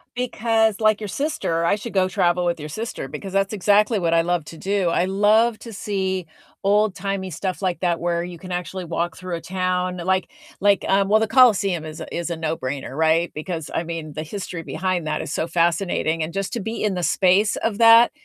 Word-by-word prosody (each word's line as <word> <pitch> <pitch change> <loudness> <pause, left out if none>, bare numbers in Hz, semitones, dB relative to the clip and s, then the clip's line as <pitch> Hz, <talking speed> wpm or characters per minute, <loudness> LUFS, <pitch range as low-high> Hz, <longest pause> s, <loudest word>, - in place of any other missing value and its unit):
Because, 225 -3 +1
like 215 -1 +3
your 210 - -4
sister, 195 - -1
I 185 - +3
should 215 +3 -7
go 190 -2 +3
travel 175 -1 +1
with 170 -2 0
your 150 - -7
sister, 220 - -5
because 155 +7 -7
that's 195 +1 +1
exactly 210 +2 +3
what 170 -3 0
I 165 - +5
love 175 -2 -1
to 165 - -11
do. 195 -3 0
I 170 +1 +1
love 215 +4 +3
to 230 -2 -10
see 190 -3 -2 0.4
old-timey 195 -2 0
stuff 185 +4 -4
like 180 -2 0
that 175 -2 0
where 170 0 -1
you 175 -1 -7
can 185 +2 -10
actually 180 +1 -4
walk 170 0 -2
through 185 -1 -5
a 165 - -6
town. 185 +1 -1
Like 185 +1 0 0.3
like, 200 -1 +3
um, 195 0 +2
well, 215 - +5
the 220 - +1
Colosseum 205 -9 +4
is 155 0 -8
a - - -7
is 170 0 -3
a 170 - -3
no-brainer, 145 -5 -3
right? 160 +2 +2
Because, 160 0 -5
I - - 0
mean, 165 -2 -6
the 155 +2 -4
history 180 0 -6
behind 180 0 -2
that 155 - -1
is 150 - -5
so 160 - -1
fascinating, 170 -1 0
and 155 +1 -2
just 195 +4 -3
to 235 - -2
be 225 +3 -4
in 210 -2 +1
the 180 -1 -3
space 190 +5 +3
of 215 -2 -2
that 230 +1 +7
185 Hz, 215 wpm, -22 LUFS, 170-205 Hz, 0.4 s, that